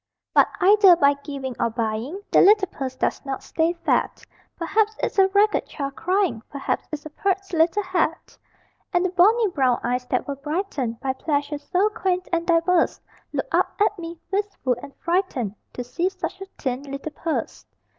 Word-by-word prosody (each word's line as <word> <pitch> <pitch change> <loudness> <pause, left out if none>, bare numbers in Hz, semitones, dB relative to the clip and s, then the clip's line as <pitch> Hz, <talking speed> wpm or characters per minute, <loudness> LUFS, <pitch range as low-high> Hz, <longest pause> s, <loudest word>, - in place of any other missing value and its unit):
But - - +6
either 395 -1 +7
by 285 -3 +4
giving 280 -3 -6
or 235 - +2
buying, 230 - -3
The - - +6
little 410 -1 +6
purse 260 -2 -5
does - - -1
not 270 -1 -4
stay 325 +1 0
fat - - +1 0.3
Perhaps 425 +5 +1
it's - - -1
a 385 - +7
ragged 410 +2 +2
child 275 -2 -5
crying, 365 - 0
Perhaps 280 -1 -3
it's 305 -1 -6
a 310 - -8
"pert 390 +3 -2
little 335 +5 +2
hat." 355 -3 -1 0.6
And 355 0 +2
the 370 - 0
bonny 420 +6 +4
brown 260 -7 +1
eyes 250 +1 -1
that 250 - -1
were 280 -1 -4
brightened 280 - -3
By 265 -1 -1
pleasures 290 +1 -3
so 390 +3 +3
quaint 375 -4 -1
and 335 0 0
diverse, 340 +1 +2 0.3
Look - - -2
up - - +1
at 420 -1 +2
me, 335 0 -7
wistful 395 -10 -1
and 275 - -11
frightened, 335 - -1 0.2
To 250 - -4
see 335 +9 -1
such 385 0 -6
a - - -5
thin 255 -1 -2
little 275 +2 -6
purse. 320 +2 -4
330 Hz, 175 wpm, -23 LUFS, 275-380 Hz, 0.6 s, either